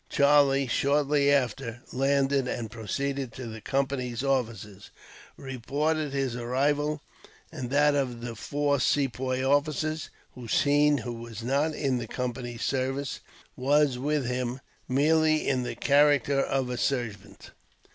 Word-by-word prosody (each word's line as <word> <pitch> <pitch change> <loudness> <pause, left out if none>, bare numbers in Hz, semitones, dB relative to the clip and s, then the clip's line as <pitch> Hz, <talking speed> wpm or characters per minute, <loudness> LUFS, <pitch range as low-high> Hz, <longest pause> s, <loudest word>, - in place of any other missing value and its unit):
Charlie 140 -1 +4
shortly 140 +2 +2
after 120 -3 -1
landed, 135 0 +2
and, 115 -3 -4
proceeding 135 +4 -3
to 125 +2 -8
the 110 -1 -8
Company's 130 -2 -2
offices, 115 -7 -2 0.5
reported 145 +4 -2
his 135 -3 -1
arrival, 145 +5 0 0.5
and 125 -2 -5
that 145 +2 +4
of 130 -4 -1
the 120 -1 -5
four 145 +4 0
Sepoy 130 -1 0
officers. 150 +2 0 0.2
Hossein, 145 +4 +2
who 120 - -4
was 115 -1 -8
not 140 +5 0
in 135 -4 0
the 115 - -5
Company's 120 -1 -4
service, 135 +2 -2 0.4
was 140 0 +2
with 145 0 0
him 125 +1 -2 0.3
merely 155 +3 +3
in 130 -2 +1
the 125 - -4
character 145 -1 +3
of 135 -2 -1
a 125 - -3
servant. 120 -8 -3
135 Hz, 125 wpm, -27 LUFS, 125-145 Hz, 0.5 s, Charlie